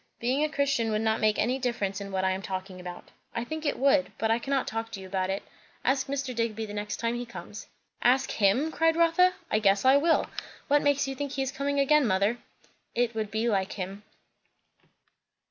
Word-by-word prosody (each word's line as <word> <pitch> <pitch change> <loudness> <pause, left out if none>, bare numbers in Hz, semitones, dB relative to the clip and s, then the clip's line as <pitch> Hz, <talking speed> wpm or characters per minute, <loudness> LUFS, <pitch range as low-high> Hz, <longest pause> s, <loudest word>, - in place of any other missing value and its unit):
"Being 255 +5 +1
a 305 - +1
Christian 275 -6 +1
would 215 0 0
not 220 0 +1
make 215 -1 +3
any 250 +5 +1
difference 205 -6 -2
in 200 0 -6
what 190 -1 -1
I 190 - +3
am 190 +1 -2
talking 185 -1 -5
about." 180 -1 -9 0.2
"I 230 - -1
think 315 +4 -4
it - - 0
would; 275 +1 +3
but 220 0 +1
I 230 - +2
cannot 275 +2 0
talk 225 0 -4
to 195 - -5
you 190 - -9
about 185 0 -2
it, 195 +1 -2 0.4
Ask 265 0 +2
Mr. 275 -1 -2
Digby 225 -2 -2
the 205 - -8
next 210 0 -3
time 230 0 -1
he 240 0 -3
comes." 210 -2 -9 0.3
"Ask 260 +2 +3
him!" 235 +10 +2
cried 325 0 +2
Rotha. 335 +2 +4 0.2
"I 215 - +3
guess 200 0 +3
I 265 +2 +7
will! 325 +3 +3 0.4
What 290 +1 +4
makes 285 -1 +2
you 270 - -3
think 280 +1 -4
he 270 - 0
is 265 - -3
coming 280 +1 -1
again, 280 -1 +4
mother?" 200 +4 +1 0.6
"It 240 -1 +1
would 220 -2 -2
be 220 +2 -1
like 195 -3 0
him." 195 +1 -5
235 Hz, 215 wpm, -28 LUFS, 205-275 Hz, 0.6 s, I